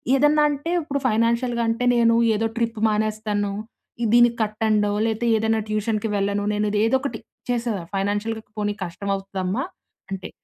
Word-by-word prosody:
ఏదన్న 295 +2 +4
అంటే 290 +4 -3
ఇప్పుడు 280 -2 -3
ఫైనాన్షియల్‌గంటే 235 +1 +1
నేను 230 -1 +4 0.2
ఏదో 225 +2 0
ట్రిప్పు 230 -2 -1
మానేస్తాను. 215 -1 -1 0.6
దీనికి 240 0 +6
కట్టండో 215 -1 +1
లేతే 225 +1 -1
ఏదన్నా 220 0 +1
ట్యూషన్‌కి 215 0 -1
వెళ్ళను. 200 0 0
నేనుది 210 0 0
ఏదోకటి 260 -1 0 0.3
చేసేద 235 -3 0 0.2
ఫైనాన్షియల్‌గా 205 +3 -1 0.2
"పోనీ 205 0 0
కష్టమవుతుదమ్మా" 195 +4 -3 0.5
అంటే 195 -1 -5
220 Hz, 120 wpm, -23 LUFS, 205-235 Hz, 0.6 s, దీనికి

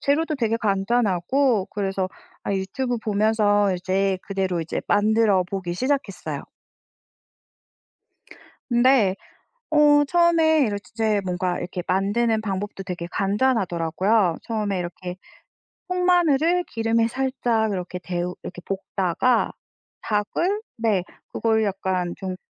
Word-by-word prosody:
재료도 305 +2 +1
되게 230 -3 +1
간단하고 215 +2 +1
그래서 195 -2 -2 0.3
아 - - -2
유튜브 240 +6 -2
보면서 205 -2 +2
이제 190 +1 0
그대로 190 -3 -1
이제 160 - -3
만들어 210 -2 +3
보기 180 -1 -4
시작했어요. 255 -4 -2 2.3
근데 240 -5 +4 0.5
어 295 -1 +5
처음에 330 0 +4
이럴 205 -2 -2
즈 - - -20
제 215 -2 +1
뭔가 180 -1 -1
이렇게 180 0 -4
만드는 215 +4 +1
방법도 200 -1 -4
되게 175 -2 -5
간단하더라고요. 195 -3 +1
처음에 210 -4 -2
이렇게 180 +1 -5 0.7
통마늘을 355 -2 +3
기름에 225 -2 +1
살짝 240 -4 0
이렇게 180 -1 -4
데우 180 0 -3
이렇게 180 -1 -8
볶다가 195 +4 0 0.5
닭을 340 - -1 0.2
네 220 -5 +1 0.3
그걸 220 -1 +1
약간 190 -3 -1
좀 185 -1 -5
205 Hz, 265 characters per minute, -23 LUFS, 185-245 Hz, 2.3 s, 어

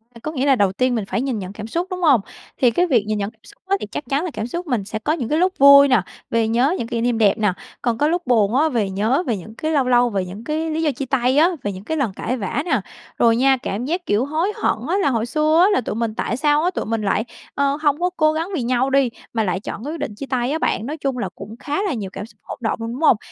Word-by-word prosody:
V - - -10
có 305 - -3
nghĩa 275 -3 -1
là 275 -2 +5
đầu 200 -5 +2
tiên 255 +5 0
mình 220 -3 -2
phải 235 - -2
nhìn 260 -5 -2
nhận 190 0 -7
cảm 215 +1 -7
xúc, 340 +10 -2
đúng 365 -1 -5
hông? 285 - +5 0.4
Thì 245 -3 +4
cái 355 +10 +2
việc 245 -9 +3
nhìn 215 0 -1
nhận 200 0 -2
xúc - - -18
á 390 - +2
thì - - -4
chắc - - -4
chắn 280 +3 +1
là 360 - -3
cảm 215 - -4
xúc 345 +7 -5
mình 240 -8 -1
sẽ 215 +2 -4
có 295 +8 0
những 255 -8 -3
cái 305 - +1
lúc 370 +1 +2
vui 280 0 +8
nè, 255 -6 +4 0.3
vì 230 -1 +1
nhớ 245 +9 +2
những 230 - -3
kỷ 230 0 -2
niệm 240 -1 +1
đẹp 210 -2 +3
nè, 210 -4 +1 0.3
còn 235 -3 0
có 295 - +2
lúc 345 -1 -1
buồn 225 -3 +3
á, 310 +4 +3
về 225 -8 0
nhớ 220 - +1
về 230 -4 0
những 215 +5 -11
cái 315 +6 -2
lâu 290 -4 +3
lâu 245 -1 +4
về 195 -4 -1
những 195 +5 -9
cái 310 +4 -2
lý 315 +1 -1
do 310 -2 +2
chia 275 +1 -5
tay 260 0 +1
á, 325 +4 +6
về 205 - -1
những 190 0 -9
cái 320 +8 -3
lần 250 -9 0
cãi 255 +6 -3
vã 210 +6 -2
nè. 270 - +1 0.4
Rồi 230 -1 +5
nha, 265 +2 +4
cảm 215 +5 -3
giác, 350 +5 -2
kiểu, 210 +5 +1
hối 320 +7 0
hận - - 0
á, 360 - +2
là 285 - +2
hồi 230 -4 0
xưa 310 +6 +3
á, - - +2
tụi 215 - -4
mình 225 -1 -2
tại 230 - -2
sao 295 +2 +2
á, 355 - +3
tụi - - -3
mình 225 0 -1
lại, 210 +2 0 0.3
ờ, 280 0 +1
hông 295 -1 +2
có 360 +1 +1
cố 310 -1 +3
gắng 320 +2 -2
vì 295 - -1
nhau 250 +2 +1
đi, 270 -2 +3 0.2
mà 225 -2 +1
lại 185 -2 -1
chọn 205 - -7
cái 295 +4 -4
quyết 330 - -6
định 210 - -4
chia 275 - -6
tay 255 -1 -1
á 315 - -1
bạn. 220 - 0
Nói 300 +5 -4
chung 275 -3 -2
là 240 - -2
cũng 210 +3 -9
khá 295 +5 -2
là 395 - -1
nhiều 210 -6 -4
cảm 205 - -6
xúc 225 - -21
hỗn - - -7
động 225 0 -1
luôn, 230 0 -4
đúng 260 - -7
hông? 305 -8 +5
255 Hz, 310 wpm, -21 LUFS, 220-305 Hz, 0.4 s, vui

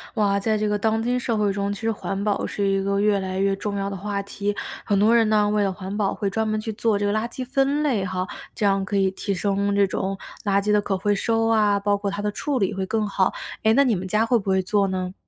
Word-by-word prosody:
哇， 200 -2 +2
在 215 +2 0
这 215 - 0
个 210 0 +1
当 220 +1 +1
今 245 +2 0
社 240 -2 -1
会 205 -2 +1
中， 200 0 -1
其 205 - -5
实 225 0 0
环 195 -2 -4
保 205 0 0
是 200 -1 -1
一 195 0 +1
个 200 0 0
越 205 -1 +3
来 190 0 -3
越 195 0 +2
重 200 +1 -4
要 195 0 -2
的 200 - -5
话 200 +1 -3
题， 200 +1 -3 0.3
很 200 -2 +1
多 220 +3 +5
人 230 -2 +4
呢， 210 -1 +3
为 210 0 +2
了 195 - +1
环 190 +1 -6
保 205 -2 0
会 200 - -2
专 220 +3 -1
门 215 0 -1
去 220 +1 -4
做 215 -1 +1
这 205 - 0
个 205 - +1
垃 215 +2 0
圾 255 +1 -6
分 275 +3 +1
类 255 -10 +1
哈， 185 0 -2 0.3
这 210 - -1
样 195 -1 +2
可 200 +1 -2
以 195 -1 +3
提 200 +1 -3
升 200 +1 0
这 200 0 +3
种 190 +1 -2 0.3
垃 200 -1 +2
圾 205 - -3
的 210 0 +4
可 195 -1 -1
回 205 +2 +1
收 225 +2 +1
啊， 210 -3 +3
包 205 0 +1
括 200 0 -3
它 200 +1 -4
的 210 - 0
处 275 +5 -2
理 200 0 0
会 190 -1 -2
更 215 +2 -1
好， 195 -2 +1 0.3
诶， 220 - +4
那 275 +4 +5
你 240 -5 +2
们 185 +1 -4
家 215 +4 +1
会 240 +1 +3
不 200 -3 -4
会 190 0 +3
做 200 +2 +1
呢？ 185 -1 -3
205 Hz, 305 characters per minute, -23 LUFS, 195-215 Hz, 0.3 s, 多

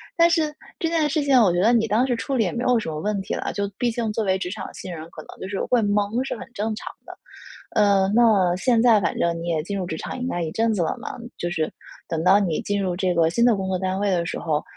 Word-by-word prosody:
但 335 0 +5
是 320 -3 +1 0.2
这 345 - -1
件 320 -2 +1
事 310 +1 0
情， 275 -3 +5
我 200 -5 +4
觉 175 - 0
得 220 +5 +4
你 230 -2 +3
当 225 +4 +2
时 250 - +1
处 235 +5 -3
理 235 - +3
也 180 - -1
没 240 - -3
有 250 -1 +3
什 - - -6
么 155 -1 -4
问 210 +1 -1
题 195 - -5
了， - - -3
就 200 -1 -2
毕 245 - +1
竟 225 -1 -2
作 220 - -1
为 190 -1 +2
职 185 -1 -4
场 220 - -6
新 185 - -8
人， 160 -1 -7
可 155 - -9
能 - - -13
就 - - -4
是 200 - -3
会 245 -2 +2
懵， 205 +4 0
是 - - -3
很 - - -8
正 220 0 -2
常 - - -8
的。 - - -9 0.6
呃， 200 -3 +4
那 210 -7 +4
现 235 +3 +2
在 230 -3 +6
反 - - -1
正 170 0 0
你 170 - -5
也 165 -2 0
进 200 +4 -4
入 185 - -2
职 160 -2 -4
场 - - -6
应 250 - -3
该 175 -8 -2
一 160 -2 -3
阵 225 +3 +1
子 200 - -1
了 - - -1
嘛， 260 - -6 0.2
就 175 - -3
是， 160 -2 -1 0.4
等 165 -1 -2
到 190 +3 +6
你 175 -6 -1
进 205 0 -1
入 185 -2 -1
这 185 0 0
个 165 -2 +3
新 235 +8 +1
的 240 -2 +5
工 190 -1 -3
作 190 -1 0
单 190 +1 -2
位 205 0 +1
的 175 -3 +1
时 - - -4
候， 155 -2 -1
200 Hz, 320 characters per minute, -23 LUFS, 180-235 Hz, 0.6 s, 在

